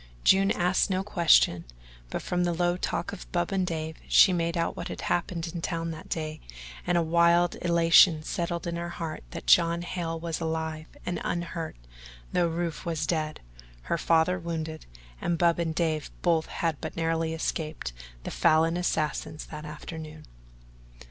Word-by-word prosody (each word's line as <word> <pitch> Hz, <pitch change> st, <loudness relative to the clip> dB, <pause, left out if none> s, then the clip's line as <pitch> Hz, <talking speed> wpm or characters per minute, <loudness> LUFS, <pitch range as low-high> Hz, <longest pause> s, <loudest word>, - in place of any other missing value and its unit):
June 195 Hz, +1 st, +5 dB
asked 180 Hz, +1 st, +2 dB
no 190 Hz, 0 st, 0 dB
question, 170 Hz, -, +4 dB, 0.5 s
but -, -, -4 dB
from 180 Hz, 0 st, 0 dB
the 175 Hz, -1 st, +1 dB
low 175 Hz, +1 st, +1 dB
talk 175 Hz, -1 st, -2 dB
of -, -, -10 dB
Bub 175 Hz, +1 st, 0 dB
and 190 Hz, -2 st, 0 dB
Dave 160 Hz, -1 st, -4 dB
she 190 Hz, -, +7 dB
made 170 Hz, 0 st, 0 dB
out 165 Hz, -, 0 dB
what 170 Hz, -, -5 dB
had -, -, -6 dB
happened 170 Hz, -1 st, -1 dB
in 170 Hz, -, -4 dB
town 165 Hz, -1 st, -2 dB
that 155 Hz, -, -9 dB
day 155 Hz, -1 st, -3 dB, 0.5 s
and 175 Hz, 0 st, +3 dB
a 170 Hz, -, +3 dB
wild 170 Hz, +1 st, +4 dB
elation 170 Hz, -1 st, +5 dB
settled 170 Hz, +1 st, -3 dB
in 170 Hz, 0 st, -2 dB
her 170 Hz, 0 st, -4 dB
heart 165 Hz, -2 st, -5 dB
that 170 Hz, -, -7 dB
John 170 Hz, 0 st, +4 dB
Hale 165 Hz, -2 st, -3 dB
was 165 Hz, -1 st, -3 dB
alive 160 Hz, -1 st, -3 dB, 0.2 s
and 180 Hz, -, -2 dB
unhurt 170 Hz, -1 st, -3 dB, 0.6 s
though 175 Hz, -1 st, +3 dB
Rufe 165 Hz, -1 st, -3 dB
was 160 Hz, -2 st, -2 dB
dead, 155 Hz, -1 st, -2 dB, 0.4 s
her 65 Hz, -, -1 dB
father 165 Hz, +2 st, +3 dB
wounded, 160 Hz, -2 st, -5 dB, 0.3 s
and 170 Hz, -, 0 dB
Bub 170 Hz, 0 st, +3 dB
and 165 Hz, -2 st, -1 dB
Dave 160 Hz, -3 st, 0 dB
both 165 Hz, -2 st, +2 dB
had 165 Hz, -4 st, -2 dB
but 160 Hz, -, -6 dB
narrowly 165 Hz, 0 st, 0 dB
escaped 155 Hz, -, -3 dB, 0.3 s
the -, -, -5 dB
Falin 165 Hz, +1 st, +3 dB
assassins 155 Hz, -3 st, -2 dB
that 150 Hz, -1 st, -7 dB
afternoon. 155 Hz, +1 st, -8 dB
165 Hz, 170 wpm, -28 LUFS, 160-175 Hz, 0.6 s, she